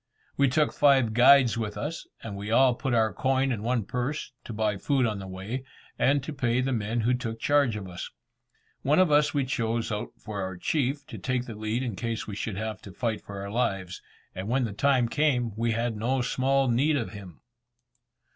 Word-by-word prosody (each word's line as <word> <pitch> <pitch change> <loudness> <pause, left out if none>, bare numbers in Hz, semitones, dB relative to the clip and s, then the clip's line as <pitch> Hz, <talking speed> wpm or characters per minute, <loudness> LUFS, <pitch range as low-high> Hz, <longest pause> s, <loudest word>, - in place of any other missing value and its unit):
We 140 -1 +3
took 150 +3 +2
five 135 -6 +4
guides 125 0 +6
with 105 -2 -3
us, 160 +3 -4 0.2
and 105 -3 -6
we 100 +1 -5
all 125 +2 +5
put 130 0 -1
our 110 -1 +2
coin 135 0 +1
in 110 -4 -2
one 115 -1 0
purse, 130 +8 -3
to - - -7
buy 105 -2 0
food 135 +4 +1
on 110 -3 -1
the 95 - -7
way, 95 +8 -5 0.4
and 140 0 +3
to 155 - -5
pay 125 -3 +1
the 130 +1 0
men 115 0 -1
who 120 +3 +2
took 115 -3 -3
charge 140 -5 +3
of 100 -3 -5
us. 90 0 -7 0.7
One 145 +3 +2
of 185 -4 +4
us 150 0 +3
we 140 -2 +2
chose 115 -2 -1
out 105 0 -4
for 105 -2 -6
our 95 -1 -4
chief, 140 - -1
to 155 - -9
take 130 -1 -1
the 115 - -7
lead 110 +4 -2
in 120 -6 -3
case 115 +3 -3
we 105 - -6
should 100 -1 -4
have 110 -2 -4
to 100 - -10
fight 110 +3 -2
for 100 -1 -8
our 100 0 -6
lives; 95 -6 -1 0.3
and 95 +2 -5
when 130 +2 +2
the 110 -4 -2
time 130 +1 +2
came, 125 -3 +1
we 115 +1 0
had 115 0 -1
no 125 +4 0
small 135 +2 +1
need 135 +6 +2
of - - -3
him. 90 -10 -11
120 Hz, 215 wpm, -27 LUFS, 105-135 Hz, 0.7 s, guides